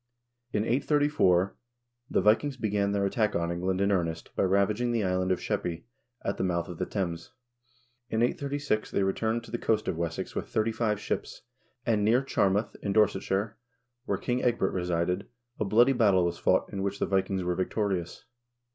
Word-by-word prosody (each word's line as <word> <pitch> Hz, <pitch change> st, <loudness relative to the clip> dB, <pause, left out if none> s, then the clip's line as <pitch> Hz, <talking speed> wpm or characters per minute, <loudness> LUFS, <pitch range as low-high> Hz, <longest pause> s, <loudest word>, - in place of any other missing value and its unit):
In 105 Hz, -, 0 dB
834 135 Hz, -, +3 dB
l 95 Hz, -, -6 dB, 0.6 s
the -, -, +2 dB
Vikings 130 Hz, +6 st, +3 dB
began 100 Hz, -3 st, 0 dB
their 100 Hz, -1 st, +1 dB
attack 105 Hz, +2 st, 0 dB
on 85 Hz, 0 st, 0 dB
England 90 Hz, +2 st, -1 dB
in 100 Hz, +1 st, +2 dB
earnest 85 Hz, -4 st, -2 dB
by -, -, 0 dB
ravaging 100 Hz, +5 st, +2 dB
the 115 Hz, -2 st, +1 dB
island 95 Hz, 0 st, 0 dB
of 90 Hz, -, +1 dB
Sheppey,2 85 Hz, -1 st, -3 dB, 0.4 s
at 100 Hz, -, -2 dB
the -, -, -1 dB
mouth 85 Hz, -2 st, 0 dB
of 85 Hz, -, -8 dB
the -, -, -1 dB
Thames. 85 Hz, -5 st, -3 dB, 0.8 s
In 110 Hz, 0 st, +1 dB
836 140 Hz, -3 st, -1 dB
they 100 Hz, -, 0 dB
returned 110 Hz, +4 st, 0 dB
to -, -, -12 dB
the 120 Hz, -, -2 dB
coast 110 Hz, -1 st, 0 dB
of 90 Hz, -, -1 dB
Wessex 85 Hz, -1 st, -3 dB
with -, -, -4 dB
thirty 110 Hz, +1 st, +1 dB
five 110 Hz, -2 st, 0 dB
ships, -, -, -4 dB, 0.4 s
and 110 Hz, -3 st, +2 dB
Dear 120 Hz, +5 st, +3 dB
Charmouth, 100 Hz, -4 st, +1 dB
in 100 Hz, -, -1 dB
Dorsetshire, 105 Hz, 0 st, +1 dB, 0.5 s
where 100 Hz, -, 0 dB
King 125 Hz, +5 st, -1 dB
Ecgbert 120 Hz, -6 st, +1 dB
resided, 90 Hz, +1 st, -1 dB, 0.3 s
a 110 Hz, -, 0 dB
bloody 120 Hz, +7 st, +5 dB
battle 100 Hz, -7 st, +4 dB
was 85 Hz, -, -2 dB
fought -, -, +2 dB
in 100 Hz, -, -3 dB
which 100 Hz, 0 st, -2 dB
the -, -, 0 dB
Vikings 95 Hz, -1 st, 0 dB
were 90 Hz, 0 st, 0 dB
victorious. 95 Hz, -1 st, -2 dB
100 Hz, 180 wpm, -28 LUFS, 90-110 Hz, 0.8 s, bloody